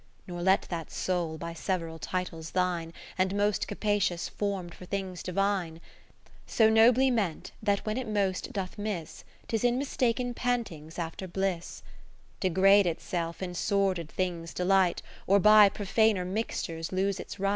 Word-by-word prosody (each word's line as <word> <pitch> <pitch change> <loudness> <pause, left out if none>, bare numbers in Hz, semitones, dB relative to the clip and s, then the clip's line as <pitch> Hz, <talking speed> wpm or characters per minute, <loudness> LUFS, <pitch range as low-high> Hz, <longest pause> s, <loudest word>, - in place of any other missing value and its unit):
Nor 175 -1 -6
let 190 +2 +3
that 165 -3 -4
soul, 175 -4 -2
by 170 +1 -6
several 165 -2 -3
titles 165 -3 -4
Thine, 175 -3 0 0.3
And 185 +1 +1
most 205 0 +1
capacious 205 -4 0
form'd 195 -4 -3
for 180 - -11
things 190 -2 -4
Divine, 190 -3 -1
40 165 - -16 0.6
(So 220 -1 +4
nobly 240 +4 +5
meant, 200 -9 -1
that 205 -2 0
when 215 +1 -1
it 260 -2 -3
most 200 -3 -1
doth 195 0 -5
miss, 205 -6 -4 0.2
'Tis 225 -1 -1
in 245 0 +3
mistaken 250 -2 0
pantings 225 -12 -3
after 170 +2 -4
bliss) 185 -1 -3 0.6
Degrade 195 +1 +5
itself 170 +1 -3
in 180 -1 -4
sordid 185 -3 0
things' 170 -2 -3
de 180 - -1
light, 190 -2 +3 0.2
Or 200 +1 +5
by 210 +1 +8
profaner 205 -1 +1
mixtures 175 -5 -3
lose 195 +1 0
its - - -8
right. 195 +1 +1
190 Hz, 155 wpm, -29 LUFS, 175-205 Hz, 0.6 s, by